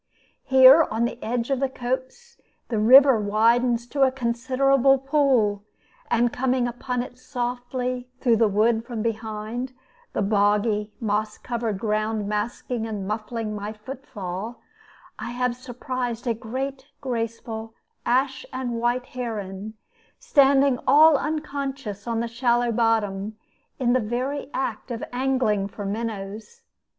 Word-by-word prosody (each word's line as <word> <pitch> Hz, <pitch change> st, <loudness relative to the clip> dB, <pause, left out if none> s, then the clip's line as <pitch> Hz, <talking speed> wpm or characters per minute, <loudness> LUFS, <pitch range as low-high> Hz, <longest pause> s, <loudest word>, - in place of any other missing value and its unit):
Here, 265 Hz, +4 st, +8 dB
on 225 Hz, +2 st, 0 dB
the 235 Hz, +1 st, -5 dB
edge 235 Hz, +3 st, -2 dB
of 270 Hz, -, +1 dB
the 270 Hz, 0 st, 0 dB
copse, 260 Hz, -, -5 dB, 0.3 s
the 225 Hz, -3 st, 0 dB
river 260 Hz, +2 st, +7 dB
widens 230 Hz, +3 st, +2 dB
to 280 Hz, +2 st, -2 dB
a 265 Hz, -1 st, +5 dB
considerable 265 Hz, +2 st, +2 dB
pool, 260 Hz, -7 st, +2 dB, 0.5 s
and 235 Hz, 0 st, +2 dB
coming 255 Hz, -1 st, +1 dB
upon 245 Hz, +1 st, -3 dB
it 250 Hz, 0 st, -12 dB
softly 250 Hz, 0 st, -3 dB
through 235 Hz, -4 st, +3 dB
the 225 Hz, 0 st, +4 dB
wood 220 Hz, +3 st, +2 dB
from 235 Hz, -2 st, -5 dB
behind 225 Hz, +2 st, -4 dB, 0.4 s
the -, -, 0 dB
boggy, 210 Hz, +1 st, +2 dB
moss 215 Hz, -1 st, -1 dB
covered 230 Hz, -4 st, -3 dB
ground 215 Hz, 0 st, -1 dB
masking 225 Hz, +2 st, -3 dB
and 205 Hz, -3 st, -4 dB
muffling 215 Hz, +1 st, -3 dB
my 210 Hz, +1 st, -5 dB
foot 260 Hz, +6 st, -10 dB
fall 200 Hz, +2 st, -6 dB, 0.6 s
I -, -, -5 dB
have 250 Hz, 0 st, 0 dB
surprised 250 Hz, -1 st, -4 dB
a 235 Hz, -, +1 dB
great, 265 Hz, +4 st, -5 dB
graceful 230 Hz, -2 st, -4 dB, 0.3 s
ash 260 Hz, +2 st, +1 dB
and 245 Hz, -3 st, -3 dB
white 240 Hz, +1 st, 0 dB
heron, 215 Hz, -4 st, -5 dB, 0.4 s
standing 280 Hz, -, +4 dB
all 310 Hz, +1 st, +7 dB
unconscious 275 Hz, -8 st, -3 dB
on 230 Hz, -1 st, 0 dB
the 235 Hz, -, -2 dB
shallow 240 Hz, 0 st, +1 dB
bottom, 215 Hz, -2 st, 0 dB, 0.4 s
in 245 Hz, -2 st, +2 dB
the 255 Hz, -, +3 dB
very 255 Hz, +5 st, -3 dB
act 265 Hz, 0 st, -3 dB
of 235 Hz, -2 st, -4 dB
angling 250 Hz, -6 st, +1 dB
for 205 Hz, +1 st, -7 dB
minnows. 215 Hz, -, -5 dB
240 Hz, 135 wpm, -24 LUFS, 220-260 Hz, 0.6 s, Here